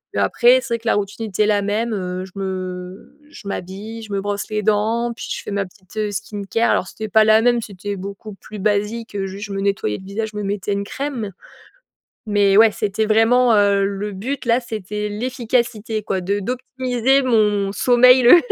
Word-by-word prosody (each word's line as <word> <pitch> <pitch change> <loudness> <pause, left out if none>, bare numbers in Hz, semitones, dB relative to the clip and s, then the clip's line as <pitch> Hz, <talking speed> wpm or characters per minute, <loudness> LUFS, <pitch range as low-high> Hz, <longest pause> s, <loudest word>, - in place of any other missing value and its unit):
et - - +1
après, 250 +2 +4
c'est 235 - -2
vrai - - -5
que 225 - -9
la - - +4
routine 205 +2 -3
était 210 +1 +1
la 205 -1 +2
même, 215 +4 -1
heu, 185 -2 -3
je 190 - -15
me 185 -1 -6
je 230 - -12
m'habille, 200 +4 -6
je 215 - -10
me 200 - 0
brosse 205 0 -3
les 210 0 -2
dents 220 +3 +1
puis - - -7
je - - -4
fais - - -6
ma 200 -1 -1
petite, 185 +1 -19
heu, 215 -1 0
skincare. 210 +2 -1
Alors, 180 - +1
c'était 220 +2 -6
pas 215 +1 +5
la 220 0 +5
même, 240 0 +3
c'était 205 -1 -6
beaucoup 200 +3 -8
plus 210 +2 -11
basique, 210 +3 -1
heu, 195 -1 -1
juste 195 +2 -7
je 200 - -6
me 195 - -2
nettoyais 195 - -1
le 190 - -13
visage, 215 +3 -3
je 210 - -7
me 210 - -3
mettais 200 0 -2
une 200 0 -2
crème 245 -5 -4 1.0
mais, 200 -1 +4
ouais, 225 0 +7
c'était 210 +2 -1
vraiment, 230 +2 +4
heu, 200 -1 +3
le 200 +1 -4
but 255 +8 -4
là, 235 +1 +3
c'était 210 -3 -4
l'efficacité, 230 -1 -2
quoi, 195 -2 -2
de 200 +3 -1
d'optimiser 255 +3 0
mon 210 -5 +2
sommeil 250 +3 +6
le 245 +8 +9
210 Hz, 205 wpm, -20 LUFS, 200-230 Hz, 1.0 s, le